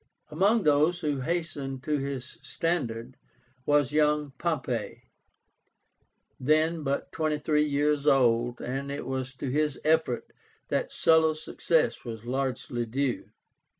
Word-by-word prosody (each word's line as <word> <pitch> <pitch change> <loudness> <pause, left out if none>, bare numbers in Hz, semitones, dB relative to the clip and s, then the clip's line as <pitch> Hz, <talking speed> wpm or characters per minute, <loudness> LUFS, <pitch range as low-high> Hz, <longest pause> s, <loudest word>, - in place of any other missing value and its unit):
Among 200 +8 +3
those 155 +4 +3
who 145 -4 -1
hastened 140 -4 -3
to 150 0 0
his 135 -1 -5
standard 130 -8 -2 0.5
was 145 -1 +3
young 150 -1 +2
POMPEY, 160 -6 -2 1.4
then 155 +4 +2
but 140 -1 -2
twenty 155 -2 0
three 150 0 +1
years 145 0 +1
old, 120 -3 +3
and 135 +3 -3
it 140 - -4
was 130 +1 -4
to 130 0 -4
his 150 +1 0
efforts 155 -6 +1 0.4
that - - -1
Sulla's 160 -1 +3
success 165 -2 +1
was 115 -2 -7
largely 125 -2 -2
due. 130 +2 -2
145 Hz, 120 wpm, -28 LUFS, 130-155 Hz, 1.4 s, Among